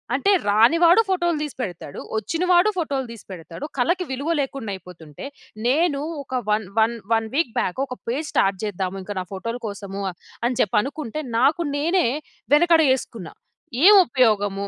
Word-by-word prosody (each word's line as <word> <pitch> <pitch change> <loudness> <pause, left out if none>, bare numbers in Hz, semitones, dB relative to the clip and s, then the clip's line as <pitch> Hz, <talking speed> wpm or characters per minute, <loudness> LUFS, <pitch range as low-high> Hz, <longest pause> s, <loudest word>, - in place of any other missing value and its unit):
అంటే, 340 +10 +2 0.2
రాని 220 +9 +5
వాడు 345 +6 +7
ఫోటోలు 345 -4 +1
తీసిపెడతాడు. 200 - -6 0.2
వచ్చిన 325 - -2
వాడు 355 +4 +5
ఫోటోలు 285 -7 -2
తీసిపెడతాడు. 190 - -9
కళకి 345 +9 +1
విలువ 280 +6 -1
లేకుండా 270 -5 -3
అయిపోతుంటే, 175 - -11 0.4
నేను 290 +2 +2 0.2
ఒక 260 -1 -3
one 210 -1 +1
one 225 +2 +3 0.2
one 225 0 0
week 285 -6 +1
back 185 -1 -2
ఒక 255 -2 -8
పేజ్ 290 +6 -2
స్టార్ట్ 195 -1 +1
చేద్దాము 195 -1 -3
ఇంక 205 - -6
నా - - -3
ఫోటోల 230 +6 -4
కోసము 200 -1 -6 0.4
అని 245 -1 -3
చెప్పి 205 - +2
అనుకుంటే, 290 +1 -5 0.2
నాకు 300 +7 +3
నేనే 335 +5 +2 0.5
వెనకడుగేసుకున్న. 295 - +2 0.6
ఏం 420 - +10
ఉపయోగము 205 -7 +1
250 Hz, 145 wpm, -22 LUFS, 200-310 Hz, 0.6 s, ఏం